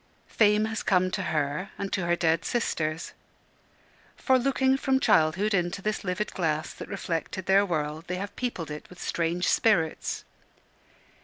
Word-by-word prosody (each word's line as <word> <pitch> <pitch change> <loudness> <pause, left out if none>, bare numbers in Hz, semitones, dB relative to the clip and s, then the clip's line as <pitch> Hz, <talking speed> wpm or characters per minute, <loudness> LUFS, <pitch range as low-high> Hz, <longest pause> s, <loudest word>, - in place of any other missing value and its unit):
Fame 210 0 +3
has 220 0 -3
come 185 -1 +2
to - - -2
her 150 +4 -1
and 200 -1 -4
to 185 -3 -1
her 175 - +3
dead 165 -1 +1
sisters. 160 -9 -2 1.0
For 260 -1 +3
looking 265 +1 +2
from 265 -1 +1
childhood 190 - +3
into 175 0 0
this 215 0 -1
livid 195 +3 -2
glass 155 -3 -1
that - - -9
reflected 185 -1 -3
their 195 +1 +5
world, 155 -1 -2
they 180 - -2
have 195 +2 -5
peopled 185 -11 -3
it 150 - -8
with 180 - -14
strange 170 +1 -1
spirits. 170 -8 +1
180 Hz, 155 wpm, -27 LUFS, 160-210 Hz, 1.0 s, their